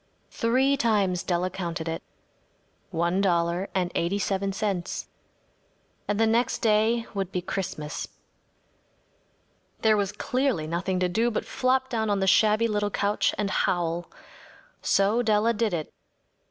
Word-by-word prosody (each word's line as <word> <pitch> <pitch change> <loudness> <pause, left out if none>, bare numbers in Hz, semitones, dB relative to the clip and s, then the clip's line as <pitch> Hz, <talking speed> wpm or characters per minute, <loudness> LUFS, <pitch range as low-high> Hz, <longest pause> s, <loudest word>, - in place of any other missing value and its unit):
Three 260 +4 +2
times 200 -7 +1
Della 180 +1 -1
counted 170 -3 -4
it. 165 0 -3 0.9
One 175 +2 0
dollar 175 0 +1
and 180 -2 0
eighty 175 +4 0
seven 195 0 -1
cents. 190 -2 -2 1.0
And 205 0 0
the 225 - +5
next 230 +2 +1
day 225 +1 +3
would 195 -2 -3
be 180 - -1
Christmas. 175 -4 -4 1.8
There 220 -1 +5
was 200 -1 0
clearly 245 - -1
nothing 180 +3 -1
to 180 - +3
do 225 +7 +1
but 215 - -2
flop 260 +1 +1
down 220 -2 -1
on 200 -1 +1
the 190 - +1
shabby 215 +3 +4
little 205 -1 0
couch 205 +1 0
and 205 -2 -1
howl. 175 -1 0 0.7
So 205 +4 +2
Della 220 0 +2
did 225 -1 0
it. 160 -3 -4
200 Hz, 140 wpm, -26 LUFS, 180-220 Hz, 1.8 s, the